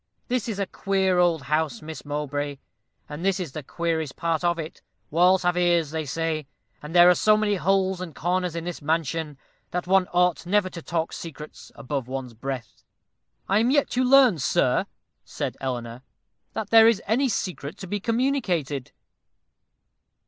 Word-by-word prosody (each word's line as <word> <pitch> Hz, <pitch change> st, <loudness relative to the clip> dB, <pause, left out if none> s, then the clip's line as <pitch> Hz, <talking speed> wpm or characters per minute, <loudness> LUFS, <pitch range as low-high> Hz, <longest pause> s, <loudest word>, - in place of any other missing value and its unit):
This 245 Hz, -2 st, -1 dB
is 210 Hz, -, -3 dB
a 200 Hz, -, 0 dB
queer 190 Hz, -1 st, 0 dB
old 170 Hz, -4 st, +2 dB
house, 150 Hz, -4 st, -1 dB
Miss 160 Hz, 0 st, -8 dB
Mowbray; 145 Hz, -1 st, -3 dB, 0.5 s
and 150 Hz, +3 st, -7 dB
this 195 Hz, 0 st, +1 dB
is 175 Hz, -7 st, -4 dB
the 155 Hz, -, -6 dB
queerest 160 Hz, 0 st, -2 dB
part 165 Hz, -1 st, -1 dB
of 170 Hz, -1 st, +2 dB
it. 160 Hz, -1 st, -7 dB, 0.3 s
Walls 180 Hz, +4 st, +4 dB
have 175 Hz, 0 st, +2 dB
ears, 175 Hz, -4 st, +2 dB
they 160 Hz, -1 st, -3 dB
say; 155 Hz, +1 st, -2 dB, 0.3 s
and 150 Hz, +3 st, -8 dB
there 175 Hz, 0 st, +8 dB
are 180 Hz, -, +8 dB
so 215 Hz, +4 st, +4 dB
many 215 Hz, -1 st, +1 dB
holes 190 Hz, 0 st, +1 dB
and 175 Hz, -4 st, -7 dB
corners 180 Hz, 0 st, -1 dB
in 170 Hz, -, -3 dB
this 175 Hz, -1 st, -5 dB
mansion, 160 Hz, -1 st, -1 dB, 0.3 s
that 180 Hz, 0 st, -3 dB
one 185 Hz, 0 st, +3 dB
ought 180 Hz, -1 st, +2 dB
never 190 Hz, 0 st, +2 dB
to 170 Hz, -, -8 dB
talk 165 Hz, 0 st, -2 dB
secrets 155 Hz, -2 st, -9 dB
above 140 Hz, -2 st, -4 dB
one's 130 Hz, -2 st, -5 dB
breath." 125 Hz, -1 st, -6 dB, 0.6 s
"I 200 Hz, +2 st, +3 dB
am 230 Hz, +2 st, +2 dB
yet 285 Hz, +1 st, +2 dB
to 255 Hz, -, +1 dB
learn, 255 Hz, -, +6 dB
sir," -, -, +1 dB, 0.4 s
said -, -, -4 dB
Eleanor, 120 Hz, -2 st, -4 dB, 0.5 s
"that 210 Hz, -2 st, -4 dB
there 225 Hz, 0 st, +8 dB
is 230 Hz, -4 st, +4 dB
any 255 Hz, +6 st, +2 dB
secret 185 Hz, -8 st, -4 dB
to 190 Hz, -, -7 dB
be 205 Hz, +3 st, -3 dB
communicated." 210 Hz, -, -1 dB
170 Hz, 170 wpm, -25 LUFS, 150-195 Hz, 0.6 s, there